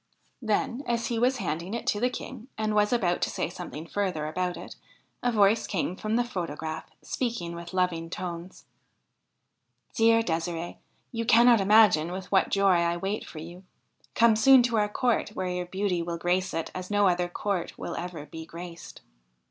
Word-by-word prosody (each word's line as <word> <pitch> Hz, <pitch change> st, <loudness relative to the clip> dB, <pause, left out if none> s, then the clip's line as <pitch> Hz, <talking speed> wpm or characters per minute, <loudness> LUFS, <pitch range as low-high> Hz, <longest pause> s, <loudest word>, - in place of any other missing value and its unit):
Then, 235 Hz, +3 st, 0 dB
as 235 Hz, -1 st, 0 dB
he 235 Hz, -2 st, -1 dB
was 255 Hz, +2 st, +2 dB
handing 175 Hz, +1 st, -3 dB
it 235 Hz, -, -5 dB
to 205 Hz, -, +1 dB
the 250 Hz, +3 st, +2 dB
King, 250 Hz, -1 st, -8 dB
and 215 Hz, -1 st, -1 dB
was 210 Hz, 0 st, +3 dB
about 185 Hz, -8 st, +1 dB
to -, -, +1 dB
say -, -, -3 dB
something 170 Hz, -3 st, -7 dB
further 180 Hz, -4 st, -2 dB
about 180 Hz, +3 st, -2 dB
it, -, -, -9 dB, 0.5 s
a 245 Hz, -, +1 dB
voice 210 Hz, 0 st, +3 dB
came 180 Hz, -2 st, -2 dB
from 215 Hz, +3 st, -2 dB
the 245 Hz, -, +3 dB
photograph, 160 Hz, -8 st, -5 dB
speaking 230 Hz, -9 st, -3 dB
with 170 Hz, 0 st, -8 dB
loving 180 Hz, -3 st, 0 dB
tones: 175 Hz, 0 st, -6 dB, 0.6 s
' -, -, -48 dB
Dear 230 Hz, 0 st, +4 dB
De'sire'e, 170 Hz, -1 st, -3 dB, 0.3 s
you 230 Hz, -1 st, -2 dB
cannot 235 Hz, -1 st, +6 dB
imagine 195 Hz, -5 st, +5 dB
with 185 Hz, 0 st, -6 dB
what 190 Hz, -, +3 dB
joy 195 Hz, -2 st, +4 dB
I 170 Hz, 0 st, +1 dB
wait 195 Hz, +4 st, -3 dB
for -, -, -11 dB
you: 170 Hz, +4 st, -9 dB, 0.5 s
come 230 Hz, -1 st, +5 dB
soon 260 Hz, +3 st, +7 dB
to 240 Hz, -2 st, +1 dB
our 210 Hz, -1 st, +2 dB
court, 225 Hz, -2 st, 0 dB
where 185 Hz, -1 st, -2 dB
your 180 Hz, 0 st, -3 dB
beauty 190 Hz, -1 st, -1 dB
will 170 Hz, 0 st, -3 dB
grace 180 Hz, +2 st, 0 dB
it 165 Hz, -, -3 dB
as 185 Hz, 0 st, -6 dB
no 205 Hz, -1 st, +3 dB
other 175 Hz, -1 st, +1 dB
court 190 Hz, -1 st, -3 dB
will -, -, -5 dB
ever 170 Hz, -4 st, -6 dB
be 160 Hz, +1 st, -8 dB
graced.' 170 Hz, +1 st, -10 dB
185 Hz, 185 wpm, -27 LUFS, 170-220 Hz, 0.6 s, soon